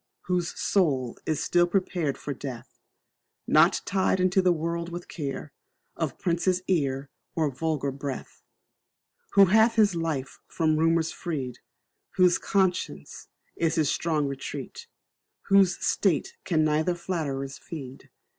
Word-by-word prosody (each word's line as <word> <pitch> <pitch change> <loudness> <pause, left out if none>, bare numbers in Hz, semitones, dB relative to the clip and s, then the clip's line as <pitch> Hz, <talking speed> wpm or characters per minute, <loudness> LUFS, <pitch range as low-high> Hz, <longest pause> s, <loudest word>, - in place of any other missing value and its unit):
Whose 180 -2 -2
soul 135 - +1
is 155 -2 0
still 175 0 +3
prepared 175 -5 -1
for 145 - -5
death 130 -3 -8 0.7
Not - - +4
tied 190 -1 +1
unto 185 +1 +3
the 185 -1 +4
world 170 +1 -2
with 175 +1 -7
care 145 -1 -5 0.4
Of 155 -6 -3
prince's 180 +1 0
ear, 140 -6 0 0.2
or 155 -3 +1
vulgar 140 0 -1
breath: 135 0 -6 0.9
Who 200 - +8
hath 220 +4 +4
his 210 -4 +4
life 160 -6 -3
from 155 -2 +1
rumours 165 0 +2
freed, 135 -8 -4 0.6
Whose 180 -2 +4
conscience 190 -2 -1 0.3
is 165 -1 0
his 155 -3 +2
strong 155 -3 0
retreat 140 - -6 0.6
Whose 195 -3 +5
state 180 -8 +1
can 160 -4 +2
neither 155 +3 +1
flatterers 140 -7 -3
feed. 135 -6 -9
165 Hz, 125 wpm, -27 LUFS, 145-180 Hz, 0.9 s, Who